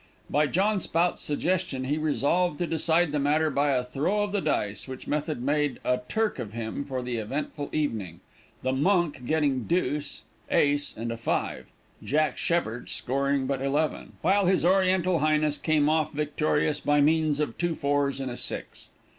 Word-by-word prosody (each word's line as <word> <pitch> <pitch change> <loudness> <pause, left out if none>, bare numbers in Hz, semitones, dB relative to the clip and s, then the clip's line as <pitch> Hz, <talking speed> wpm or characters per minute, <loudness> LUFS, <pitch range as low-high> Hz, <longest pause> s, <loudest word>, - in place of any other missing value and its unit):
By 150 +2 +3
John 200 +6 +1
Spout's 170 0 0
suggestion 170 -2 -1
he 145 +4 -1
resolved 155 +2 +1
to 175 - -1
decide 165 0 +2
the 150 - 0
matter 150 +2 +2
by 145 +1 +1
a 130 -2 +2
throw 150 +12 0
of 205 - -3
the 205 -1 0
dice, 105 - -1
which 130 -1 -8
method 150 -3 -2
made 145 0 0
a 125 0 +2
"Turk" 220 -8 0
of 110 -4 -5
him 115 +4 -4
for 130 -2 -3
the 125 -1 -3
eventful 140 +6 -4
evening, 110 - -2 0.4
the 130 - +1
"Monk" 150 -4 +1
getting 145 -6 +1
deuce, 150 -4 -1 0.3
ace, 145 0 +1
and 115 +1 -3
a 115 - -4
five, 115 - -2 0.4
"Jack 150 -1 +1
Sheppard" 125 -9 -1
scoring 140 +1 0
but 135 0 -2
eleven, 145 +3 -1
while 195 0 +3
his 185 -2 +3
oriental 185 -1 +3
highness 150 0 +2
came 155 -2 +2
off 155 0 +2
victorious, 150 0 0
by 145 0 +2
means 155 0 +3
of 150 -6 -1
two 175 -2 0
fours 140 -1 0
and 135 -2 -3
a 120 - -6
six. - - -5
150 Hz, 170 wpm, -27 LUFS, 135-165 Hz, 0.4 s, By